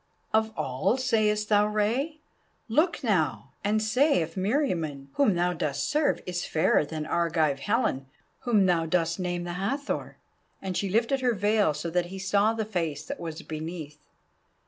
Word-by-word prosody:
"Of 220 Hz, 0 st, +2 dB
all, 135 Hz, -, 0 dB
sayest 215 Hz, -4 st, +1 dB
thou, 210 Hz, 0 st, +4 dB
Rei? 240 Hz, +9 st, -1 dB, 0.5 s
Look 310 Hz, +9 st, +1 dB
now, 160 Hz, -, 0 dB
and 215 Hz, +2 st, +1 dB
say 250 Hz, -, +3 dB
if 165 Hz, +1 st, -7 dB
Meriamun, 180 Hz, -, -1 dB
whom 265 Hz, -10 st, +3 dB
thou 175 Hz, +1 st, +1 dB
dost 150 Hz, -4 st, -2 dB
serve, 300 Hz, 0 st, +1 dB
is 180 Hz, -1 st, -3 dB
fairer 160 Hz, 0 st, +2 dB
than 155 Hz, +1 st, -5 dB
Argive 160 Hz, -5 st, +1 dB
Helen, 170 Hz, -, 0 dB, 0.3 s
whom 215 Hz, -6 st, +3 dB
thou 170 Hz, -3 st, +2 dB
dost 170 Hz, +1 st, 0 dB
name 175 Hz, -1 st, -2 dB
the 175 Hz, 0 st, -4 dB
Hathor?" 255 Hz, +11 st, -3 dB, 0.4 s
and 190 Hz, -2 st, -4 dB
she 195 Hz, -, -1 dB
lifted 230 Hz, +6 st, +1 dB
her 245 Hz, -2 st, +2 dB
veil 205 Hz, -5 st, +2 dB
so 165 Hz, +3 st, -4 dB
that 175 Hz, 0 st, +1 dB
he 190 Hz, +2 st, -8 dB
saw 200 Hz, +3 st, +2 dB
the 220 Hz, -1 st, -2 dB
face 165 Hz, -8 st, -3 dB
that -, -, -6 dB
was 165 Hz, -2 st, -6 dB
beneath. 155 Hz, -1 st, -6 dB
190 Hz, 165 wpm, -27 LUFS, 165-220 Hz, 0.5 s, thou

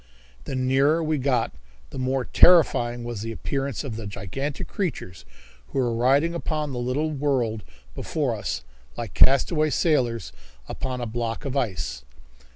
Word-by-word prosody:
The 135 Hz, -, -4 dB
nearer 135 Hz, +5 st, +3 dB
we 155 Hz, -1 st, 0 dB
got 125 Hz, -3 st, +1 dB, 0.4 s
the -, -, -6 dB
more 130 Hz, 0 st, 0 dB
terrifying 120 Hz, -9 st, +5 dB
was 120 Hz, -3 st, -5 dB
the 115 Hz, +1 st, -4 dB
appearance 135 Hz, +3 st, -3 dB
of 120 Hz, -6 st, -5 dB
the 110 Hz, -2 st, -6 dB
gigantic 100 Hz, +9 st, -4 dB
creatures 90 Hz, -, -4 dB, 0.4 s
who -, -, -6 dB
were 125 Hz, -3 st, +1 dB
riding 135 Hz, +8 st, +3 dB
upon 155 Hz, -3 st, -2 dB
the 125 Hz, -, -3 dB
little 135 Hz, +6 st, -1 dB
world 130 Hz, -7 st, 0 dB, 0.3 s
before -, -, -1 dB
us -, -, -3 dB, 0.3 s
like -, -, -5 dB
castaway 155 Hz, +4 st, +4 dB
sailors 120 Hz, -, +1 dB, 0.3 s
upon 130 Hz, -1 st, -4 dB
a -, -, -2 dB
block 115 Hz, +1 st, -3 dB
of 135 Hz, -1 st, -3 dB
ice. 90 Hz, -, -2 dB
130 Hz, 150 wpm, -25 LUFS, 115-145 Hz, 0.4 s, terrifying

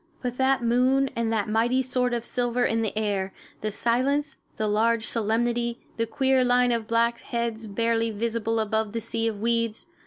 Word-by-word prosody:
But 250 Hz, 0 st, -3 dB
that 265 Hz, -1 st, +2 dB
moon 255 Hz, +3 st, +3 dB
and 230 Hz, -1 st, 0 dB
that 215 Hz, -3 st, 0 dB
mighty 235 Hz, +4 st, +2 dB
sword 250 Hz, -1 st, 0 dB
of 235 Hz, 0 st, -4 dB
silver 245 Hz, 0 st, 0 dB
in 225 Hz, 0 st, +1 dB
the 215 Hz, -1 st, -2 dB
air, 200 Hz, -3 st, -1 dB, 0.3 s
the 215 Hz, -, -1 dB
silence, 255 Hz, +7 st, 0 dB, 0.2 s
the 215 Hz, -, 0 dB
large 225 Hz, +2 st, +2 dB
solemnity, 235 Hz, +1 st, 0 dB, 0.2 s
the 230 Hz, 0 st, 0 dB
queer 265 Hz, +2 st, +2 dB
line 245 Hz, 0 st, +3 dB
of 230 Hz, -2 st, -1 dB
black 230 Hz, +1 st, +2 dB
heads 230 Hz, -2 st, -3 dB
barely 230 Hz, +2 st, 0 dB
visible 225 Hz, +1 st, -1 dB
above 220 Hz, 0 st, -1 dB
the 230 Hz, -, -1 dB
sea 225 Hz, 0 st, -1 dB
of 215 Hz, -3 st, -3 dB
weeds! 230 Hz, 0 st, 0 dB
230 Hz, 180 wpm, -26 LUFS, 220-245 Hz, 0.3 s, moon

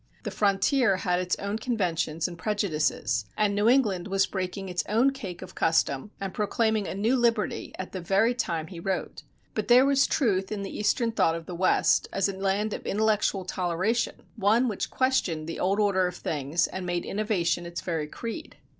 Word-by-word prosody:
The -, -, -4 dB
frontier 200 Hz, +3 st, +2 dB
had 180 Hz, -1 st, 0 dB
its 180 Hz, -1 st, 0 dB
own 200 Hz, +2 st, -3 dB
conventions 170 Hz, -9 st, -1 dB
and 175 Hz, -, -8 dB
prejudices, 155 Hz, -, -1 dB
and 210 Hz, -1 st, +2 dB
New 205 Hz, +3 st, +3 dB
England 210 Hz, -9 st, +2 dB
was 195 Hz, -1 st, +2 dB
breaking 190 Hz, 0 st, -4 dB
its 180 Hz, -1 st, -1 dB
own 235 Hz, +6 st, +4 dB
cake 205 Hz, -11 st, -7 dB
of -, -, -11 dB
custom 160 Hz, 0 st, +1 dB
and 195 Hz, -1 st, -4 dB
proclaiming 215 Hz, -1 st, 0 dB
a -, -, -4 dB
new 220 Hz, +6 st, +2 dB
liberty 235 Hz, -4 st, 0 dB
at 185 Hz, -, -6 dB
the 185 Hz, -, -5 dB
very 195 Hz, +7 st, +2 dB
time 170 Hz, -10 st, -2 dB
he 170 Hz, 0 st, -9 dB
wrote. 190 Hz, +2 st, -3 dB, 0.3 s
But -, -, -2 dB
there 250 Hz, +2 st, +7 dB
was 275 Hz, 0 st, +4 dB
truth 195 Hz, -8 st, +1 dB
in 205 Hz, -2 st, -3 dB
the 195 Hz, -, -6 dB
Eastern 230 Hz, +3 st, +1 dB
thought 165 Hz, -7 st, +2 dB
of 165 Hz, -1 st, -6 dB
the 180 Hz, -, -7 dB
West, 185 Hz, +2 st, +3 dB
as 195 Hz, 0 st, +1 dB
a 195 Hz, -, -4 dB
land 200 Hz, +2 st, 0 dB
of -, -, -5 dB
intellectual 210 Hz, -2 st, +1 dB
toleration, 185 Hz, +5 st, -1 dB
one 220 Hz, +5 st, +3 dB
which 210 Hz, -5 st, -2 dB
questioned 200 Hz, -12 st, 0 dB
the 165 Hz, -, -5 dB
old 195 Hz, +3 st, +1 dB
order 195 Hz, -3 st, +3 dB
of 180 Hz, -, -5 dB
things 150 Hz, 0 st, -1 dB
and 190 Hz, -, -5 dB
made 175 Hz, -1 st, -2 dB
innovation 175 Hz, -5 st, -1 dB
its 170 Hz, -, -5 dB
very 160 Hz, -4 st, -2 dB
creed. 230 Hz, -, -7 dB
195 Hz, 190 wpm, -27 LUFS, 175-220 Hz, 0.3 s, there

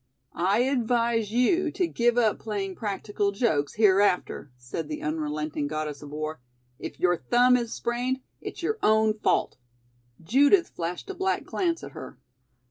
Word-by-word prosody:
"I 195 Hz, +6 st, +2 dB
advise 235 Hz, -4 st, +1 dB
you 315 Hz, +9 st, +2 dB
to 365 Hz, -, +1 dB
give 240 Hz, -6 st, +1 dB
up 225 Hz, -3 st, +2 dB
playing 200 Hz, -3 st, -3 dB
practical 205 Hz, 0 st, -2 dB
jokes 175 Hz, -, 0 dB
hereafter," 195 Hz, -, +2 dB
said 125 Hz, +5 st, -5 dB
the 150 Hz, 0 st, -5 dB
unrelenting 150 Hz, -1 st, -2 dB
Goddess 155 Hz, -1 st, -4 dB
of 145 Hz, -, -9 dB
War. 155 Hz, 0 st, -4 dB, 0.4 s
"If -, -, -7 dB
your 175 Hz, -1 st, +3 dB
thumb 245 Hz, +5 st, +4 dB
is 235 Hz, -2 st, -1 dB
sprained, 250 Hz, +3 st, -2 dB, 0.2 s
it's -, -, -8 dB
your 435 Hz, +5 st, -1 dB
own 220 Hz, 0 st, +4 dB
fault." -, -, +1 dB, 0.6 s
Judith 285 Hz, -, +4 dB
flashed 175 Hz, -, -5 dB
a -, -, -6 dB
black 380 Hz, 0 st, -1 dB
glance 340 Hz, -3 st, -1 dB
at -, -, -8 dB
her. -, -, -9 dB
215 Hz, 150 wpm, -26 LUFS, 160-245 Hz, 0.6 s, thumb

